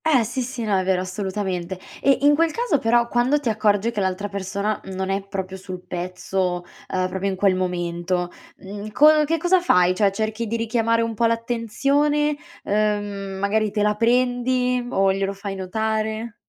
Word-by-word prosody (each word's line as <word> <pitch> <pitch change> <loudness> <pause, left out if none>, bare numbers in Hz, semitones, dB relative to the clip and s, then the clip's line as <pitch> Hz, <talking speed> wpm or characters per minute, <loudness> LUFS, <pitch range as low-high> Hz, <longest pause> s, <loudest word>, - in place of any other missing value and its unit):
Eh 280 -7 +4
sì 245 +4 -3
sì. 245 -1 -4
No, 210 -2 +1
è - - -1
vero, 185 -1 +1
assolutamente. 185 -1 -3 0.2
E 275 -1 +4
in 290 +1 +6
quel 330 +3 +3
caso 455 - 0
però 235 +1 +3
quando 245 +5 +2
ti 270 -5 -2
accorgi 210 0 +2
che 225 - -3
l'altra 190 +1 -1
persona, 200 +2 -2
mhmm, 190 - -8
non 190 0 -2
è 195 +1 0
proprio 190 -1 -5
sul 185 -1 -8
pezzo, 180 0 -2 0.3
ehm, 185 0 0
proprio 190 +1 -2
in 190 - -2
quel 195 0 +3
momento, 175 -1 -2 0.3
mhmm, 205 +2 -8
co 300 +5 +6
che 330 +3 0
cosa 355 +3 +3
fai? 180 - +4
Cioè 195 +1 +2
cerchi 220 +3 -2
di 230 +2 -1
richiamare 230 0 +1
un 230 0 -2
po' 230 +2 +1
l'attenzione, 275 +6 +1 0.3
ehm, 205 -2 -1
magari 210 +2 +1
te 210 0 -1
la 210 0 +3
prendi 250 +1 +1
o 195 -5 +2
glielo 195 0 -1
fai 200 0 -6
notare? 220 +3 -2
210 Hz, 180 wpm, -22 LUFS, 190-240 Hz, 0.3 s, in